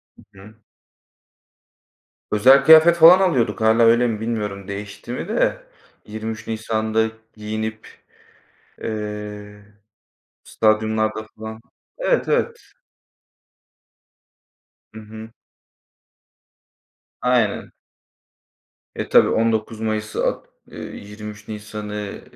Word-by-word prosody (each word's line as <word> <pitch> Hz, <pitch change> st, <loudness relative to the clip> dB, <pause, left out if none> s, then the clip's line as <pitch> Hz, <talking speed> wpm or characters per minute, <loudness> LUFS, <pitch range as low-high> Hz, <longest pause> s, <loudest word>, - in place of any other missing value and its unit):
Hı 95 Hz, -1 st, -19 dB
hı. 105 Hz, +2 st, -15 dB, 1.8 s
Özel 130 Hz, +6 st, +6 dB
kıyafet 160 Hz, +2 st, +8 dB
falan 170 Hz, +3 st, +9 dB
alıyorduk, 150 Hz, -13 st, +1 dB
Hâlâ 110 Hz, +1 st, +4 dB
öyle 115 Hz, +2 st, +4 dB
mi, 110 Hz, -2 st, -3 dB
bilmiyorum, 105 Hz, -4 st, -4 dB
değişti 100 Hz, 0 st, -7 dB
mi -, -, -5 dB
de. -, -, 0 dB, 0.4 s
23 110 Hz, +1 st, -6 dB
Nisan'da 110 Hz, 0 st, -1 dB, 0.3 s
giyinip, 110 Hz, +1 st, -5 dB, 1.0 s
eee, 105 Hz, -1 st, -6 dB, 0.8 s
stadyumlarda 110 Hz, 0 st, 0 dB
falan. 110 Hz, +1 st, -8 dB, 0.4 s
Evet, -, -, +1 dB
evet. -, -, 0 dB, 2.3 s
Hı 110 Hz, -, -9 dB
hı. 110 Hz, +1 st, -11 dB, 1.9 s
Aynen. 125 Hz, 0 st, 0 dB, 1.2 s
E, -, -, -5 dB
tabii -, -, +6 dB
19 110 Hz, -1 st, 0 dB
Mayıs 110 Hz, -1 st, -3 dB
At -, -, -1 dB, 0.3 s
eee, -, -, -9 dB
23 105 Hz, +1 st, -10 dB
Nisan'ı 105 Hz, -1 st, -7 dB
110 Hz, 85 wpm, -21 LUFS, 105-115 Hz, 2.3 s, falan